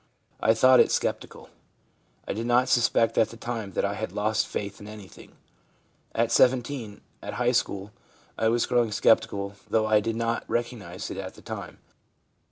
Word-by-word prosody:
I 110 Hz, -, +3 dB
thought 130 Hz, +2 st, +6 dB
it -, -, +5 dB
sceptical. -, -, -3 dB, 0.8 s
I -, -, -2 dB
did 115 Hz, +3 st, -4 dB
not 125 Hz, +1 st, +3 dB
suspect 115 Hz, -2 st, +3 dB
at 110 Hz, -, +3 dB
the 115 Hz, -, -11 dB
time 115 Hz, -5 st, -5 dB
that -, -, 0 dB
I 100 Hz, -, -1 dB
had 110 Hz, +1 st, -4 dB
lost 105 Hz, +1 st, 0 dB
faith 100 Hz, 0 st, -5 dB
in 105 Hz, -, -10 dB
anything. 105 Hz, -3 st, -12 dB, 0.8 s
At 115 Hz, 0 st, +1 dB
17, 125 Hz, -3 st, +1 dB, 0.2 s
at -, -, -6 dB
high 125 Hz, 0 st, +2 dB
school, 100 Hz, -5 st, -1 dB, 0.4 s
I 110 Hz, -, 0 dB
was 115 Hz, +1 st, +2 dB
growing 120 Hz, -3 st, +1 dB
sceptical, 100 Hz, -1 st, +2 dB, 0.2 s
though 110 Hz, -1 st, +2 dB
I 110 Hz, -1 st, +4 dB
did 115 Hz, +1 st, -2 dB
not 115 Hz, 0 st, -1 dB
recognise 120 Hz, -3 st, -4 dB
it -, -, -6 dB
at, -, -, -6 dB
the -, -, -16 dB
time. -, -, -7 dB
115 Hz, 175 wpm, -26 LUFS, 105-120 Hz, 0.8 s, thought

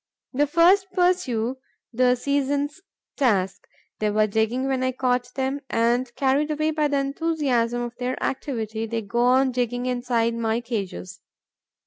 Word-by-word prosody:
The 290 Hz, +3 st, +2 dB
first 355 Hz, +6 st, +4 dB
pursue 265 Hz, -, +1 dB, 0.3 s
the 250 Hz, +1 st, +3 dB
season's 285 Hz, +4 st, -1 dB, 0.4 s
task. 200 Hz, -9 st, +1 dB, 0.3 s
They 215 Hz, -, +1 dB
were 215 Hz, +1 st, +3 dB
digging 220 Hz, +5 st, 0 dB
when 265 Hz, -1 st, 0 dB
I 255 Hz, 0 st, 0 dB
caught 250 Hz, -1 st, 0 dB
them; 270 Hz, +1 st, -1 dB
and, 240 Hz, +2 st, +1 dB
carried 280 Hz, +3 st, +1 dB
away 310 Hz, +1 st, 0 dB
by 305 Hz, -1 st, +1 dB
the 285 Hz, -1 st, 0 dB
enthusiasm 275 Hz, -5 st, 0 dB
of 240 Hz, 0 st, -6 dB
their 250 Hz, +1 st, -2 dB
activity, 225 Hz, -5 st, -3 dB
they 225 Hz, 0 st, -3 dB
go 205 Hz, +4 st, -3 dB
on 255 Hz, +2 st, +4 dB
digging 245 Hz, 0 st, -1 dB
inside 245 Hz, -2 st, 0 dB
my 230 Hz, 0 st, 0 dB
cages. 200 Hz, -, -5 dB
250 Hz, 145 wpm, -24 LUFS, 230-280 Hz, 0.4 s, first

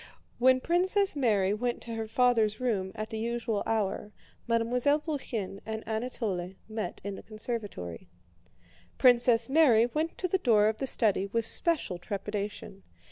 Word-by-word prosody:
When 255 Hz, +1 st, +5 dB
Princess 375 Hz, +3 st, +1 dB
Mary 210 Hz, -8 st, +2 dB
went 240 Hz, +3 st, -2 dB
to 230 Hz, -, -6 dB
her 225 Hz, -1 st, -4 dB
father's 225 Hz, -2 st, +2 dB
room 205 Hz, -7 st, -1 dB
at 215 Hz, +1 st, -5 dB
the 220 Hz, -, -4 dB
usual 230 Hz, -2 st, -2 dB
hour, 210 Hz, -1 st, -1 dB, 0.4 s
Mademoiselle 240 Hz, +5 st, +2 dB
Bourienne 245 Hz, -, -4 dB
and 220 Hz, 0 st, -6 dB
Anatole 220 Hz, -5 st, -3 dB
met 215 Hz, -5 st, -5 dB
in 200 Hz, +1 st, -4 dB
the -, -, -8 dB
conservatory. 210 Hz, -, -6 dB, 0.9 s
Princess 240 Hz, -2 st, +4 dB
Mary 265 Hz, -6 st, +5 dB
went 310 Hz, +7 st, -3 dB
to 365 Hz, -, -1 dB
the 380 Hz, +2 st, 0 dB
door 215 Hz, -, +4 dB
of 220 Hz, -, -4 dB
the 270 Hz, -, -2 dB
study 205 Hz, -6 st, +2 dB
with 230 Hz, +2 st, +1 dB
special 295 Hz, -, +2 dB
trepidation. 200 Hz, 0 st, -5 dB
225 Hz, 145 wpm, -29 LUFS, 210-250 Hz, 0.9 s, When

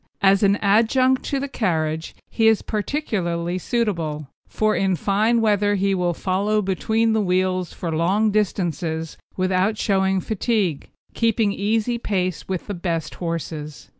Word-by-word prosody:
As 195 Hz, 0 st, +5 dB
an 200 Hz, -1 st, +4 dB
adjunct 235 Hz, +6 st, +3 dB
to 280 Hz, -, -1 dB
the 280 Hz, -, -3 dB
carriage 160 Hz, -, -2 dB
he 225 Hz, -1 st, +1 dB
is 220 Hz, -1 st, +3 dB
peculiarly 185 Hz, -, -2 dB
suitable, 170 Hz, -, -2 dB, 0.2 s
for 215 Hz, 0 st, 0 dB
in 190 Hz, -1 st, +1 dB
fine 215 Hz, +7 st, +1 dB
weather 205 Hz, -1 st, +2 dB
he 195 Hz, 0 st, +1 dB
will 175 Hz, -2 st, 0 dB
follow 200 Hz, +4 st, 0 dB
between 220 Hz, +3 st, +1 dB
the 220 Hz, -, +2 dB
wheels 185 Hz, -2 st, 0 dB
for 165 Hz, -3 st, -4 dB
long 195 Hz, +7 st, +2 dB
distances 170 Hz, -6 st, -1 dB, 0.2 s
without 185 Hz, +3 st, +1 dB
showing 190 Hz, -2 st, +1 dB
fatigue, 200 Hz, -, -1 dB, 0.2 s
keeping 225 Hz, -3 st, +1 dB
easy 225 Hz, +4 st, 0 dB
pace 185 Hz, -6 st, -2 dB
with 185 Hz, -2 st, -3 dB
the 205 Hz, -, -4 dB
best 170 Hz, -4 st, -3 dB
horses. 160 Hz, -3 st, -5 dB
195 Hz, 140 wpm, -22 LUFS, 175-215 Hz, 0.2 s, As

